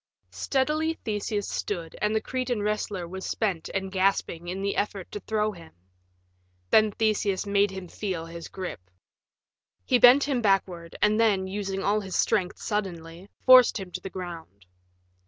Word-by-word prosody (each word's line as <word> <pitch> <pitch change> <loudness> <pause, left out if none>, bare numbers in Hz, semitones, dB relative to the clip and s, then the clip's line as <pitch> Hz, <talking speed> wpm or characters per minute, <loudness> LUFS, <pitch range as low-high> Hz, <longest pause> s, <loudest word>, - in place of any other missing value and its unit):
Steadily 305 +4 0
Theseus 205 -1 -2
stood 170 -5 -4
and 210 +1 +1
the 220 - +1
Cretan 250 -4 -2
wrestler 205 -4 -2
was 190 +2 -7
spent 190 -7 -2
and 195 -1 -3
gasping 185 -3 0
in 190 +2 -4
the 200 - -1
effort 200 -3 -3
to 205 - -5
throw 215 +2 -1
him. 170 -5 -13 1.0
Then 215 -1 +5
Theseus 210 -3 0
made 200 0 +2
him 190 -1 -7
feel 180 -2 -4
his 165 0 -8
grip. 185 - -6 1.0
He 250 - +3
bent 250 +4 +8
him 270 -4 0
backward, 185 -5 0
and 210 +1 +3
then, 205 -4 +3
using 195 0 -3
all 210 +1 +2
his 190 -3 -6
strength 190 -5 +1
suddenly, 180 -3 -4 0.2
forced 255 -3 +7
him 190 -2 -8
to - - -5
the 195 - -6
ground. 170 - -8
200 Hz, 155 wpm, -26 LUFS, 180-215 Hz, 1.0 s, bent